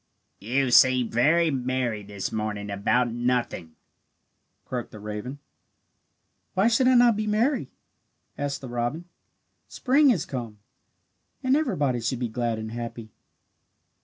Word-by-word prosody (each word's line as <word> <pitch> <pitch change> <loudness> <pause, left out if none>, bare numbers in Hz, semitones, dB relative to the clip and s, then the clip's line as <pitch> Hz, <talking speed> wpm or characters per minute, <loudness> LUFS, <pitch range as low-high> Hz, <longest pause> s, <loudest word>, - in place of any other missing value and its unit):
"You 125 +5 0
seem 125 -1 +5
very 155 +8 +3
merry 125 -4 -1
this 100 -1 -5
morning 105 -2 -3
about 120 +5 +1
nothing," 120 -9 -2 0.9
croaked 125 -2 -4
the 110 - -11
raven. 105 +6 -6 1.2
"Why 195 +5 +4
should 245 +3 +3
I 255 - +5
not 240 -2 +6
be 215 +1 -2
merry?" 235 +7 +1 0.7
asked 145 -1 -3
the 135 - -7
robin. 120 +7 -3 0.6
"Spring 280 +3 +3
has 210 - +1
come, 120 -5 -6 0.9
and 260 +1 +3
everybody 145 - 0
should 120 +3 -1
be 120 -1 -3
glad 120 0 -2
and 110 0 -6
happy." 115 -1 -7
125 Hz, 130 wpm, -25 LUFS, 115-170 Hz, 1.2 s, not